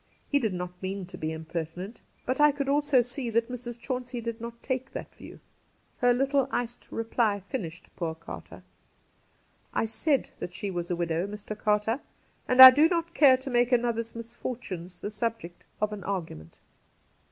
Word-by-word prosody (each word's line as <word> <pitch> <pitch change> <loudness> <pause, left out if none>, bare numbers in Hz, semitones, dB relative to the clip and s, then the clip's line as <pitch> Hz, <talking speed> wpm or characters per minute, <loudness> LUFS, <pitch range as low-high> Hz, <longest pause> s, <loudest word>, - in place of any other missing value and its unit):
He 285 - +2
did 220 -8 -1
not 180 0 -6
mean 190 0 -4
to 180 +1 -10
be 155 -2 -3
impertinent. 165 +5 -6 0.2
But 255 +3 0
I 295 0 +7
could 280 -1 -3
also 285 -2 +3
see 245 +1 -1
that 230 +2 0
Mrs. 240 -1 -6
Chauncey 250 0 -4
did 230 0 -5
not 235 0 -8
take 260 0 -3
that - - -7
view. - - -12 0.6
Her 245 -1 +4
little 270 +2 +2
iced 245 -2 -3
reply 225 -2 0
finished 185 - -7
poor 165 -2 -3
Carter. 160 - -10 0.6
' - - -39
I - - +1
said 275 +5 +1
that 180 - -6
she 200 0 -3
was 175 -1 -4
a 175 - 0
widow, 170 +1 -1
Mr. 210 +1 -7
Carter, 210 +4 +1 0.5
and 255 +1 +10
I 260 - +15
do 300 +5 +4
not 335 -1 -1
care 270 -4 +6
to 260 +1 -6
make 245 +1 +3
another's 235 -2 0
misfortunes 230 -6 -6
the 205 - -5
subject 225 -6 -4
of 210 0 0
an 200 -3 -7
argument.' 160 - -5
230 Hz, 175 wpm, -28 LUFS, 185-255 Hz, 0.6 s, I